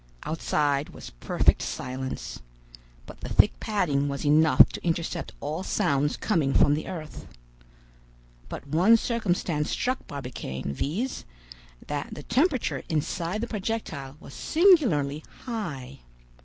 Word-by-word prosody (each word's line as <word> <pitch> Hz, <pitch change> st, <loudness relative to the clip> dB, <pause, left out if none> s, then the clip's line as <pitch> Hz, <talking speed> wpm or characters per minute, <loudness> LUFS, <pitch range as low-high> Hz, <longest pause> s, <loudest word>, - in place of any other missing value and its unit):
Outside 150 Hz, -2 st, 0 dB
was -, -, -10 dB
perfect -, -, +2 dB
silence; 130 Hz, +1 st, -5 dB, 0.6 s
but -, -, -12 dB
the -, -, -5 dB
thick -, -, +4 dB
padding 160 Hz, -10 st, 0 dB
was 140 Hz, +1 st, -4 dB
enough 155 Hz, +2 st, +7 dB
to -, -, -8 dB
intercept 165 Hz, -1 st, -2 dB
all 155 Hz, +4 st, -3 dB
sounds 145 Hz, -5 st, +1 dB
coming 160 Hz, -10 st, +1 dB
from 145 Hz, -, +5 dB
the 150 Hz, -, -2 dB
earth. 165 Hz, -5 st, -7 dB, 1.2 s
But -, -, -7 dB
one 180 Hz, +11 st, +5 dB
circumstance 180 Hz, -10 st, -1 dB
struck 255 Hz, +1 st, -1 dB
Barbicane, 125 Hz, -, -5 dB
viz., 195 Hz, -, -2 dB, 0.6 s
that 145 Hz, -1 st, -4 dB
the 150 Hz, -, -8 dB
temperature 260 Hz, -, +1 dB
inside 165 Hz, +5 st, -1 dB
the 235 Hz, -, -2 dB
projectile 185 Hz, -, -4 dB
was -, -, -12 dB
singularly 230 Hz, -, +3 dB, 0.2 s
high. 175 Hz, -, -5 dB
155 Hz, 120 wpm, -27 LUFS, 140-215 Hz, 1.2 s, enough